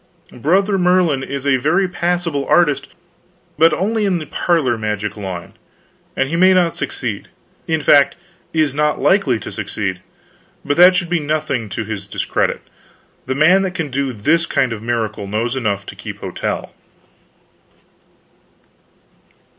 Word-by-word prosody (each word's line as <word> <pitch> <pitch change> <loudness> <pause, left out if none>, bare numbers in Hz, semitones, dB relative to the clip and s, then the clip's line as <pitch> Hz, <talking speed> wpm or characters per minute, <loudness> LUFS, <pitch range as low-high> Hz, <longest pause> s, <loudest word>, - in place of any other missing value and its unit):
Brother 190 - +1
Merlin 180 -6 +3
is 140 0 -5
a 135 -2 +3
very 165 +9 +1
passable 175 -5 -1
artist, 170 -5 +3 0.7
but 165 +1 +6
only 210 +8 0
in 185 -2 +1
the 155 - -5
parlor 155 -10 +1
magic 105 -1 -3
line, 95 -4 -6 0.6
and 135 - +1
he 160 - -3
may 185 +2 +5
not 175 -2 +2
succeed; 120 -6 -4 0.4
in 160 -2 0
fact, 140 -1 +5 0.4
is 155 -4 +1
not 150 +1 0
likely 170 - +3
to - - -8
succeed. 100 -3 -4 0.6
But 145 0 0
that 180 +1 +8
should 175 -1 -1
be 175 - +2
nothing 150 -7 -2
to 110 +3 -4
his 100 -2 -6
discredit; - - -1 0.7
the 130 - -1
man 175 +7 +5
that 190 -1 -3
can 160 -5 -3
do 135 0 -1
this 155 +10 +1
kind 125 -3 +1
of 105 - -7
miracle 110 -3 -2
knows 115 +5 -2
enough 100 -6 -2
to - - -9
keep - - -8
hotel." - - -4
145 Hz, 145 wpm, -18 LUFS, 115-175 Hz, 0.7 s, that